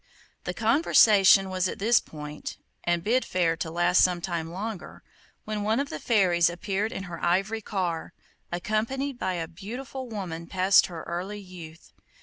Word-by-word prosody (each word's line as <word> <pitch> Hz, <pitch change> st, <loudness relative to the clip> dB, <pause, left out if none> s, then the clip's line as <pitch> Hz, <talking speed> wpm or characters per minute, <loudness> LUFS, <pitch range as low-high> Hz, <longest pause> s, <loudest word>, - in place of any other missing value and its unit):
The 180 Hz, -, -3 dB
conversation 205 Hz, -, +5 dB
was 185 Hz, 0 st, 0 dB
at -, -, -5 dB
this 220 Hz, +3 st, +4 dB
point, 150 Hz, -1 st, -8 dB, 0.3 s
and 175 Hz, -1 st, 0 dB
bid 245 Hz, +6 st, +2 dB
fair 170 Hz, -3 st, +1 dB
to 160 Hz, -, -3 dB
last 175 Hz, +2 st, +3 dB
some 180 Hz, -1 st, +2 dB
time 170 Hz, -2 st, -3 dB
longer, 200 Hz, +2 st, -6 dB, 0.4 s
when 215 Hz, -1 st, -3 dB
one 215 Hz, +4 st, +1 dB
of 280 Hz, -, -2 dB
the 155 Hz, -, -5 dB
fairies 180 Hz, -6 st, +3 dB
appeared 200 Hz, +4 st, -2 dB
in 190 Hz, -, -5 dB
her 175 Hz, -2 st, -8 dB
ivory 195 Hz, +6 st, +1 dB
car, 180 Hz, -6 st, -3 dB, 0.4 s
accompanied 230 Hz, +9 st, -2 dB
by 185 Hz, -, -1 dB
a 165 Hz, -2 st, -3 dB
beautiful 245 Hz, +9 st, -7 dB
woman 175 Hz, -6 st, -5 dB
past 190 Hz, +1 st, +4 dB
her 170 Hz, -3 st, -8 dB
early 185 Hz, +5 st, -5 dB
youth. 175 Hz, -4 st, -12 dB
185 Hz, 160 wpm, -27 LUFS, 175-215 Hz, 0.4 s, conversation